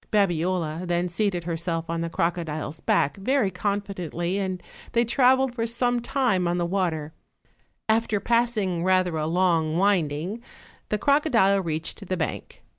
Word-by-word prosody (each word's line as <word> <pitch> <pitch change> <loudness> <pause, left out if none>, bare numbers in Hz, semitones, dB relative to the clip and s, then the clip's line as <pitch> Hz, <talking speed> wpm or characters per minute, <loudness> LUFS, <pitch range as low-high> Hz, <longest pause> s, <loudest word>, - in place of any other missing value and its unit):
Babiola 175 -3 0
then 175 +1 0
seated 180 -1 -1
herself 165 0 -2
on 165 0 -2
the 170 - -2
crocodile's 165 -3 -2
back 145 - +1
very 215 0 +1
confidently, 185 -2 -2
and 185 -2 -3 0.3
they 235 0 +3
traveled 260 +1 +3
for 230 -1 -2
some 245 +1 0
time 240 -8 +1
on 175 +1 0
the 175 - 0
water: 170 -4 -1 0.7
after 220 -1 +2
passing 215 -6 +1
rather 185 -2 +2
a 155 0 -1
long 165 -2 +2
winding, 180 +1 0 0.5
the 210 - +1
crocodile 230 -7 +3
reached 165 +4 -4
the 185 - -1
bank. 160 - -5
185 Hz, 140 wpm, -25 LUFS, 170-215 Hz, 0.7 s, they